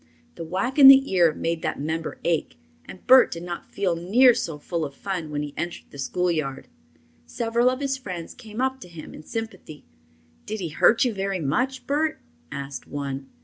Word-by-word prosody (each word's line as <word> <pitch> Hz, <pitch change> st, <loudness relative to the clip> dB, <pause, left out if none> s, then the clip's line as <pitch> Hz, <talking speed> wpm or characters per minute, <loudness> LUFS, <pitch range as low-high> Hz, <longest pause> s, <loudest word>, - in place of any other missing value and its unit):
The -, -, -7 dB
whack 195 Hz, -, -2 dB
in 275 Hz, -, +11 dB
the 270 Hz, -3 st, +8 dB
ear 175 Hz, -3 st, +5 dB
made 165 Hz, +1 st, -3 dB
that -, -, -3 dB
member 160 Hz, +2 st, -3 dB
ache, 160 Hz, -, -1 dB, 0.3 s
and 185 Hz, -, -12 dB
Bert 260 Hz, 0 st, +7 dB
did 170 Hz, 0 st, -6 dB
not 175 Hz, -1 st, -6 dB
feel 190 Hz, -4 st, 0 dB
near 230 Hz, +10 st, +5 dB
so 165 Hz, -8 st, -3 dB
full 165 Hz, +2 st, -3 dB
of 140 Hz, -2 st, -6 dB
fun 180 Hz, -4 st, -4 dB
when 150 Hz, 0 st, -3 dB
he 145 Hz, -1 st, -7 dB
entered 175 Hz, 0 st, -6 dB
the 140 Hz, -, -11 dB
schoolyard. 150 Hz, -1 st, -2 dB, 0.6 s
Several 235 Hz, -, +1 dB
of 255 Hz, +2 st, -3 dB
his 270 Hz, -1 st, -1 dB
friends 180 Hz, -8 st, -7 dB
came 225 Hz, -1 st, -7 dB
up 265 Hz, 0 st, 0 dB
to 210 Hz, -, -11 dB
him 170 Hz, -3 st, -11 dB
in -, -, -10 dB
sympathy. 220 Hz, -6 st, -7 dB, 0.6 s
"Did 215 Hz, +1 st, -4 dB
he 175 Hz, -4 st, -3 dB
hurt 225 Hz, -, +4 dB
you 240 Hz, -, 0 dB
very 195 Hz, -1 st, -2 dB
much, 250 Hz, -, -1 dB
Bert?" 300 Hz, +2 st, 0 dB, 0.3 s
asked 140 Hz, -1 st, -6 dB
one. 140 Hz, -1 st, -5 dB
180 Hz, 190 wpm, -24 LUFS, 155-240 Hz, 0.6 s, in